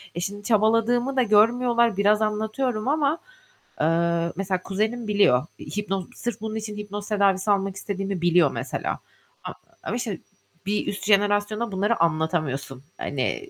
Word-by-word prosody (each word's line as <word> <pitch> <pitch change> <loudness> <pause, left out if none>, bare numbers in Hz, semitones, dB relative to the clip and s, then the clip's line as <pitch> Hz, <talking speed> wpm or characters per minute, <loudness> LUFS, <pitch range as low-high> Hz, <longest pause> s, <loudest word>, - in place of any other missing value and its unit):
E, - - -3
şimdi 205 +2 -4
çabaladığımı 230 +4 +2
da 260 - +4
görmüyorlar, 235 +1 +3
biraz 210 +2 +3
anlatıyorum 215 +2 -1
ama, 295 +2 +2 0.6
eee, 170 +1 +1
mesela 190 -1 -2
kuzenim 215 +4 -2
biliyor. 200 -11 +3 0.3
Hipnoz 195 -3 -2
sırf 240 -4 -4
bunun 220 0 -4
için 215 -1 -5
hipnoz 205 0 -6
tedavisi 200 -1 +2
almak 195 -1 0
istediğimi 195 -2 -4
biliyor 175 -4 +4
mesela. - - -3 0.4
A - - -5 0.3
ama 225 - -3
işte 225 -7 -3 0.5
bir 205 +2 -1
üst 200 - -4
jenerasyona 205 +2 +2
bunları 205 +4 0
anlatamıyorsun. 155 -5 -1
Hani, 145 - -3
205 Hz, 140 wpm, -24 LUFS, 190-220 Hz, 0.6 s, da